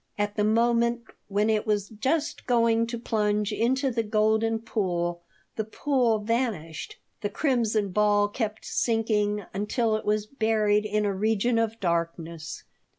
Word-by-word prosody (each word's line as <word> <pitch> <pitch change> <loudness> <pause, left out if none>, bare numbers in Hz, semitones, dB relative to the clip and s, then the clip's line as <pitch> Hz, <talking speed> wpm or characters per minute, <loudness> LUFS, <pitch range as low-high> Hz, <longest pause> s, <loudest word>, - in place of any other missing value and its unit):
At 205 0 -1
the 210 - +1
moment 235 +2 +2 0.2
when 205 +1 +1
it 215 -1 +1
was 205 -2 0
just 270 +9 -2
going 230 -2 +3
to 235 0 -4
plunge 210 -2 0
into 260 +5 +1
the 230 -1 0
golden 220 +1 +2
pool 175 -6 -2 0.4
the 220 - 0
pool 240 0 +1
vanished. 210 -8 -2 0.2
The 205 - -1
crimson 220 -5 +1
ball 205 +1 +3
kept 215 0 -4
sinking 210 -3 0
until 215 +3 0
it 215 - -3
was 210 0 0
buried 215 -3 +1
in 210 0 0
a 200 - 0
region 220 +4 +1
of 225 0 -1
darkness. 170 -2 -3
215 Hz, 145 wpm, -26 LUFS, 205-230 Hz, 0.4 s, going